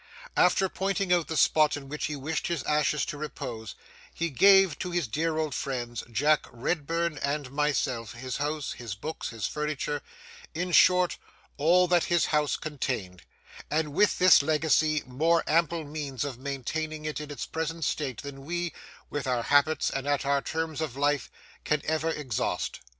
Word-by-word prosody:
After 180 +2 +4
pointing 195 0 0
out 175 -2 +2
the 160 - -3
spot 155 -1 +4
in 140 -1 -9
which 150 +2 -3
he 150 - -4
wished 155 +3 -3
his 170 -5 -2
ashes 150 0 +1
to 145 - -6
repose, 125 -7 -6 0.4
he 170 -1 -2
gave 195 +2 +6
to 180 - -3
'his 175 -5 -1
dear 155 +7 -1
old 155 -3 -1
friends,' 120 -3 -3
Jack 145 +6 +2
Redburn 165 +5 -2
and 140 -2 -2
myself, 135 -5 -1
his 125 +1 -5
house, 150 +1 -2
his 115 -5 -6
books, 155 +10 -5
his 115 -2 -4
furniture,—in 150 +3 -5
short, 180 0 +5 0.4
all 175 +5 +4
that 175 -1 +3
his 175 -2 +2
house 150 -1 +2
contained; 120 - -4 0.5
and 155 -1 0
with 205 +6 +3
this 180 -4 +7
legacy 155 0 +2
more 160 +7 +2
ample 165 +1 +1
means 145 -4 -4
of 130 -4 -6
maintaining 155 +3 -4
it 155 0 -3
in 150 - -7
its 145 - -5
present 165 0 -3
state 135 -4 -2
than 140 -1 -8
we, 175 +2 -3 0.4
with 145 -2 -3
our 125 -2 0
habits 145 +4 +3
and 135 +1 -3
at 145 -1 +1
our 140 0 +2
terms 160 0 -3
of 140 -5 -4
life, 145 -2 +1 0.3
can 150 - +1
ever 160 +1 0
exhaust. 145 -8 -2
150 Hz, 165 wpm, -28 LUFS, 140-160 Hz, 0.5 s, this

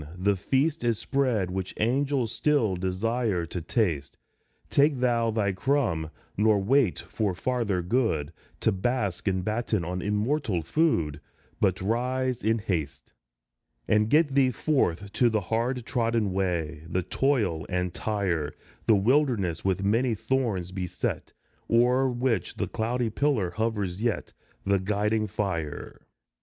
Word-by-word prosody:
The 100 +2 +2
feast 140 - 0
is 115 -2 +1
spread 125 -10 0
which 95 0 -4
angels 130 +1 +1
still 115 -4 +1
Desire 95 +1 -1
to 85 +2 -5
taste; 85 - -1 0.5
Take 140 -1 +3
thou 120 -2 +2
thy 105 -3 +1
crumb, 95 - 0 0.3
nor 105 0 +4
wait 115 +1 +2
for 105 -5 -2
farther 110 -5 -1
good, 85 - 0 0.3
To - - +3
bask 100 -1 -1
and 95 -1 0
batten 110 -4 -1
on 90 +1 -3
immortal 105 - 0
food, 80 - +1 0.4
But 95 -1 +1
rise 125 +4 0
in 110 +2 +2
haste; 90 -10 -4 0.7
And 105 +1 +3
get 150 0 +4
thee 135 -2 +4
forth 100 - 0
to 120 - +4
the 110 -1 +1
hard 115 +5 -1
trodden 115 -5 0
way, 85 -5 -1
The 90 0 0
toil 105 - 0
and 90 -1 -1
tire, 95 -8 -1 0.3
The 110 - +6
wilderness 110 - +2
with 95 0 0
many 115 +4 +2
thorns 105 -7 -1
beset, 95 -2 -3 0.4
O'er 125 +3 +4
which 120 -6 -1
the - - -2
cloudy 115 +1 -1
pillar 115 -8 +1
hovers 105 -2 -2
yet, 120 -1 -1 0.3
The 100 0 +3
guiding 105 +3 0
fire. 95 -7 -4
110 Hz, 135 wpm, -27 LUFS, 95-125 Hz, 0.7 s, The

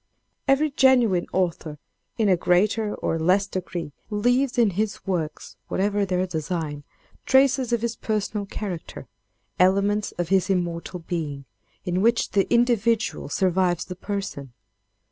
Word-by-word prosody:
"Every 280 +2 +3
genuine 245 -10 +3
author 170 -4 -1 0.4
in 220 - +2
a 190 - +5
greater 205 +5 +1
or 165 - -2
less 185 +5 +3
degree 180 -5 -5 0.2
leaves 245 +5 +1
in 230 -4 +4
his 205 +2 -3
works, 165 -5 -3
whatever 200 +1 0
their 185 0 0
design, 160 -3 -4 0.4
traces 265 -2 +4
of 235 -1 0
his 235 0 -2
personal 210 -1 -2
character: 190 -5 -6 0.5
elements 200 +3 +2
of 175 -1 -3
his 190 0 +2
immortal 175 -1 -2
being, 155 -5 -4 0.4
in 180 0 0
which 230 +2 +2
the 195 -1 +1
individual 235 - +1
survives 180 0 +1
the 180 - -7
person. 190 - -5
195 Hz, 130 wpm, -24 LUFS, 175-220 Hz, 0.5 s, a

